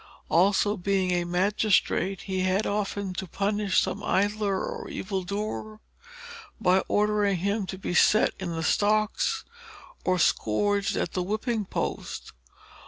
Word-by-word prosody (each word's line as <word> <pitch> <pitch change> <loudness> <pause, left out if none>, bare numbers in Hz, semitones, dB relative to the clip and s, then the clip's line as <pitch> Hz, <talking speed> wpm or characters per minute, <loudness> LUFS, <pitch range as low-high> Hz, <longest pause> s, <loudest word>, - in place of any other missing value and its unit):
Also 200 +3 +3
being 190 0 0
a 175 -1 +1
magistrate, 195 +1 +1
he 190 -1 -3
had 185 +3 +1
often 200 -2 -2
to 185 +1 -5
punish 200 +1 +1
some 200 - -2
idler 205 0 +1
or - - -6
evil 190 0 -3
doer, 215 +3 -4 0.8
by 185 +1 +4
ordering 210 -2 +2
him 200 +2 -1
to 190 - -5
be 185 - -4
set 215 +4 +4
in 180 -3 -4
the 165 - -3
stocks 215 - +1 0.6
or 185 0 +2
scourged 200 - +1
at - - -1
the 185 - -1
whipping 215 +3 -1
post. - - -4
200 Hz, 135 wpm, -27 LUFS, 185-210 Hz, 0.8 s, by